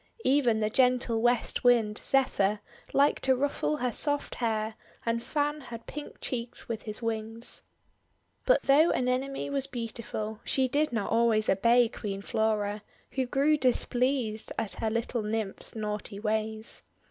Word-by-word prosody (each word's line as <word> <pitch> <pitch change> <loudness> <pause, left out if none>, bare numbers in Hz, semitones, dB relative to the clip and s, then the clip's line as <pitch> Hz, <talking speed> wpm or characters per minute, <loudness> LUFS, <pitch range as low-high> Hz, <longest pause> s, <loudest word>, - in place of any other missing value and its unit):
Even 250 -5 +3
the 215 - +1
gentle 250 -2 +2
West 240 0 +1
Wind, 230 -4 +4
Zephyr, 215 -6 +2 0.3
liked 280 +1 +3
to 265 -1 +4
ruffle 285 +3 0
her 250 -3 -1
soft 290 +3 -1
hair 220 -2 -1 0.3
and 230 0 0
fan 295 +3 -1
her 240 -3 -7
pink 290 +6 -9
cheeks 235 -2 -5
with 230 -2 -3
his 215 +2 -5
wings. 225 +1 -3 0.9
But - - +4
though 295 +5 +5
Anemone 260 +3 -1
was 275 -1 0
beautiful, 225 -3 -4
she 265 -1 +1
did 295 +3 +1
not 225 -4 -2
always 225 -2 +3
obey 235 +5 +4
Queen 200 -3 -5
Flora, 210 -1 0 0.3
who 260 -2 -1
grew 290 +4 +3
dis 255 -4 +3
pleased 245 -4 0
at 215 - +1
her 220 - +1
little 230 +1 -1
Nymph's 215 -1 -3
naughty 210 -1 -4
ways. 220 +1 -2
235 Hz, 145 wpm, -29 LUFS, 220-265 Hz, 0.9 s, though